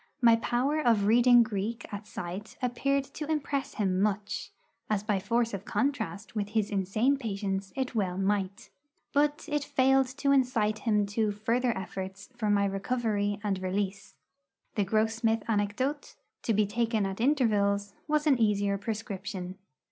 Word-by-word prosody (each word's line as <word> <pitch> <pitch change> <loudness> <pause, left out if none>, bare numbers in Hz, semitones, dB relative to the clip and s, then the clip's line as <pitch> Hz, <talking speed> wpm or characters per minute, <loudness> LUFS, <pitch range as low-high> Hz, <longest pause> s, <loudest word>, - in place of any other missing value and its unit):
My 235 -2 +6
power 260 +7 0
of 225 -7 +3
reading 240 +2 +6
Greek 220 +1 -3
at 205 +1 -6
sight 185 +5 -6
appeared 275 +3 0
to 300 +2 -7
impress 280 -2 -2
him 190 -3 +1
much, 205 0 -1 0.4
as 210 -2 0
by 210 -2 +1
force 230 +3 0
of 195 -1 -4
contrast 220 -7 -2
with 205 -1 -1
his 210 -1 +1
insane 210 +8 +1
patients 195 -5 -3
it 265 -1 -2
well 190 -5 -1
might. 195 0 -1 0.4
But 290 +1 +2
it 295 -1 0
failed 270 -2 +3
to 280 -1 +2
incite 235 -6 +2
him 210 -3 +2
to 210 +1 0
further 230 +3 0
efforts 190 +1 -6
for 220 -3 -1
my 200 -1 +3
recovery 205 0 -1
and 195 -3 -1
release. 195 +1 -3 0.6
The 205 - +1
Grossmith 220 +1 +1
anecdote, 225 +7 -1 0.3
to - - -1
be 210 +1 +3
taken 225 0 0
at 195 +2 -4
intervals, 205 -7 +2
was 300 0 +1
an 275 -5 +4
easier 200 -2 +2
prescription. 195 -3 -5
215 Hz, 150 wpm, -29 LUFS, 200-245 Hz, 0.6 s, My